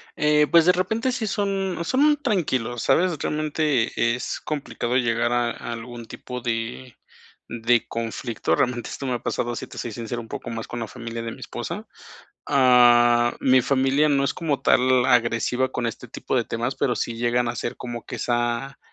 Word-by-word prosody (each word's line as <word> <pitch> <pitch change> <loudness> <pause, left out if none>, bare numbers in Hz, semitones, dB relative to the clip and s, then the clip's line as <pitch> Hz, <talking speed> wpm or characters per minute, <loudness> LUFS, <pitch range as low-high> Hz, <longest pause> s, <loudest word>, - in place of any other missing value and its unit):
Eh, 150 0 +3
pues, 165 -1 +6
de 180 - +7
repente 220 +7 0
sí 235 -3 -2
son 195 -3 -1
son 290 - +3
tranquilos, 130 - -1
¿sabes?, 175 -2 +2
realmente 150 -6 0
es 125 - -4
complicado 140 -5 -3
llegar 120 -1 +1
a 120 -1 +1
a 120 - -6
algún 120 0 -8
tipo 125 +2 -8
de 120 +1 -4 0.5
de 120 0 +1
conflicto, 115 -5 -2
realmente 120 -1 0
esto 135 - -6
me 130 - -1
ha 120 - -2
pasado, 120 0 -2
sí - - -6
te - - -12
soy 120 - -4
sincero, 120 +1 -5
un 115 - -11
poco - - -6
más 115 -1 -5
con 120 -1 -5
la 110 - -3
familia 115 -1 -6
de 115 0 -5
mi - - -11
esposa, - - -6 0.6
ah, 120 -3 +5
mi 130 -1 +4
familia 135 +3 +2
no 140 -1 +2
es 140 - 0
como 155 -5 -1
tal 130 0 +3
agresiva 125 +2 +2
con 120 -1 -2
este 120 +2 -5
tipo 130 - -3
de 120 - +2
temas, 120 +4 -3
pero 125 - 0
sí 115 - -3
llegan 120 +1 +1
a - - -1
hacer 120 0 -4
como 120 -1 -6
que - - -6
esa, 120 +2 -1
125 Hz, 185 wpm, -24 LUFS, 120-145 Hz, 0.6 s, de